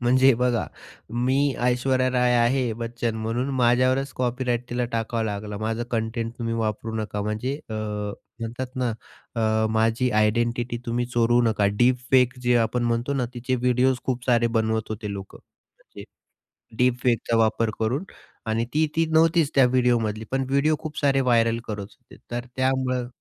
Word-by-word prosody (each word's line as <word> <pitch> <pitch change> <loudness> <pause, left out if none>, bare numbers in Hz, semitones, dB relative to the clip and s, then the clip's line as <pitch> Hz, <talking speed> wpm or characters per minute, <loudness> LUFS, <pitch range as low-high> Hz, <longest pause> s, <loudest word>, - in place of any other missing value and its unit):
म्हणजे 130 +2 +5
बघा 120 -1 0 0.6
मी 130 +1 +2 0.3
ऐश्वर्या 130 +1 +2
राय 125 -1 +2
आहे 120 0 +2
बच्चन, 115 -1 -3
म्हणून 115 +4 -2
माझ्यावरच 130 +3 +2
कॉपीराईट 125 -1 -1
तिला 120 0 0
टाकावा 115 0 -1
लागला. 105 0 -4
माझा 110 +2 -2
कंटेंट 115 0 -2
तुम्ही 115 -1 -2
वापरू 110 0 -2
नका, 105 -2 -3
म्हणजे 110 +6 -2 0.2
अ, - - -3 0.7
म्हणतात 115 +3 -4
ना, 125 -2 0 0.8
माझी 115 +3 +1
अ, 105 - -1
आयडेंटिटी 120 +3 +1
तुम्ही 120 +1 -1
चोरू 120 0 +2
नका. 110 -3 +2
डीप 125 +1 +4
फेक 125 -1 +4
जे 120 0 +3
आपण 115 +1 +1
म्हणतो 120 +3 0
ना, 130 -3 0
तिचे 125 +2 -2
व्हिडिओज 125 +1 +2
खूप 125 -1 -2
सारे 120 -2 +3
बनवत 110 0 -1
होते 105 -1 -5
लोकं. 100 -1 -8 0.4
म्हणजे - - -13 0.7
डीप 125 -1 +3
फेकचा 120 -1 +1
वापर 115 0 +2
करून 120 +9 0 0.5
आणि 115 +1 0
ती 155 +1 +3
ती 165 0 +3
नव्हतीच 160 -1 +3
त्या 135 -2 +6
व्हिडिओमधली. 120 -4 +1
पण 135 0 +1
व्हिडिओ 140 +3 +3
खूप 155 -1 -7
सारे 135 -2 +3
व्हायरल 115 -2 +2
करत 105 -2 -4
होते. 100 - -19
तर 120 0 -3
त्यामुळं 130 -1 0
120 Hz, 160 wpm, -24 LUFS, 115-130 Hz, 0.8 s, त्या